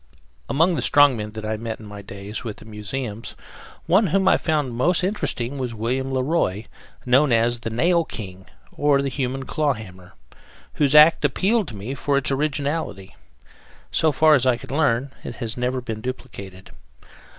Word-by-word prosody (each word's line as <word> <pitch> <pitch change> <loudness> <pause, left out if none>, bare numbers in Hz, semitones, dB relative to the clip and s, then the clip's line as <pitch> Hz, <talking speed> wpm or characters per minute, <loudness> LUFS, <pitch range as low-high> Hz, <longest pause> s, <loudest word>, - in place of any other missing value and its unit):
Among 165 +6 +3
the 165 - -1
strongmen 125 -8 +3
that 110 -1 -6
I 110 0 -2
met 115 0 -5
during 110 - -12
my 105 0 -9
days 100 +3 -7
with 110 -4 -6
the - - -14
museums, 110 +1 -6 0.5
one 195 +4 +4
whom 190 +3 +1
I - - +6
found 150 -6 -1
most 170 +10 +2
interesting 140 - -2
was 125 -3 -3
William 130 +5 -2
Le 130 -1 0
Roy, 125 - 0 0.4
known 130 +3 +4
as 120 +1 +2
The 115 - -4
Nail 170 +10 +2
King 95 - -9 0.3
and 140 -1 +2
The - - 0
Human 135 0 -3
Claw 150 0 0
Hammer, 95 -5 -12 0.6
whose 145 -1 +1
act 150 +2 +7
appealed 195 - +1
to 110 - -8
me 110 +7 -5
for 140 0 0
its 140 - +1
originality. 140 -7 -2 0.8
So 160 - +3
far 155 +2 +5
as 130 -3 +3
I 125 -2 +3
could 120 - -11
learn, 140 -3 +1
it - - -7
had 115 -3 -4
never 125 +1 -1
been 110 -3 -6
duplicated. 100 -7 -8
130 Hz, 175 wpm, -22 LUFS, 110-145 Hz, 0.8 s, act